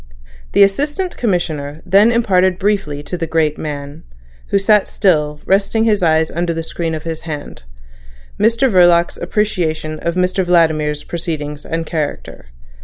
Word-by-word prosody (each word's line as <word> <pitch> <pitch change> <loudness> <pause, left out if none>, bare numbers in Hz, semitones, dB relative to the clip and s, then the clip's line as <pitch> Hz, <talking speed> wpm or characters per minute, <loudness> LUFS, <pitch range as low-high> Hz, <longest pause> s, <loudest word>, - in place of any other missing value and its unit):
The 200 - +6
Assistant 295 - 0
Commissioner 160 -8 -2
then 200 +5 +5
imparted 190 -6 +2
briefly 190 -8 -1
to 180 +3 -5
the 165 - -2
great 155 -2 0
man, 145 0 -6 0.5
who - - +1
sat 205 +1 +3
still, 150 -7 +1
resting 200 +3 +2
his 215 -3 +2
eyes 160 -2 +2
under 170 0 -2
the 165 - -3
screen 165 0 -3
of 155 - -7
his 165 -1 -4
hand, 145 -2 -7 0.8
Mr 230 +4 +3
Verloc's 175 -5 +4
appreciation 170 -6 -2
of 170 0 -2
Mr 185 +1 +1
Vladimir's 160 -4 +1
proceedings 150 -4 -5
and 165 0 -3
character. 155 - -5
170 Hz, 145 wpm, -17 LUFS, 155-195 Hz, 0.8 s, The